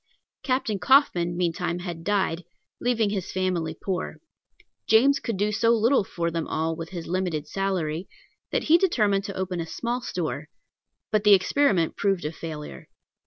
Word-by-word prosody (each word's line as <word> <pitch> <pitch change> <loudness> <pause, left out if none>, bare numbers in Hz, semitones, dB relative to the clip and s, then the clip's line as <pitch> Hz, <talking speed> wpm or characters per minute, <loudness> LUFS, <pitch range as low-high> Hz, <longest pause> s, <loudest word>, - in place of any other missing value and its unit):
Captain 255 -6 -1
Coffin 180 - +3
meantime 175 0 -1
had 175 -2 -6
died, 190 -4 0 0.4
leaving 230 -4 +1
his 195 -4 -3
family 175 -4 -1
poor. 190 -2 -3 0.7
James 270 +6 +5
could 230 -5 -3
do 205 +2 +1
so 220 +2 +2
little 235 +2 +4
for 170 -3 -3
them 165 -1 -2
all 160 +1 -1
with 165 0 -7
his 175 -3 -6
limited 170 -4 -2
salary, 180 -3 -2 0.4
that - - 0
he 330 +2 +5
determined 210 - +2
to 200 -2 -6
open 185 -1 -2
a 165 - -3
small 240 +7 -3
store; 160 -8 -4 0.6
but 215 -1 +2
the 210 -1 +8
experiment 190 - +2
proved 195 -5 0
a 150 - -1
failure. 150 - -8
185 Hz, 160 wpm, -25 LUFS, 170-215 Hz, 0.7 s, the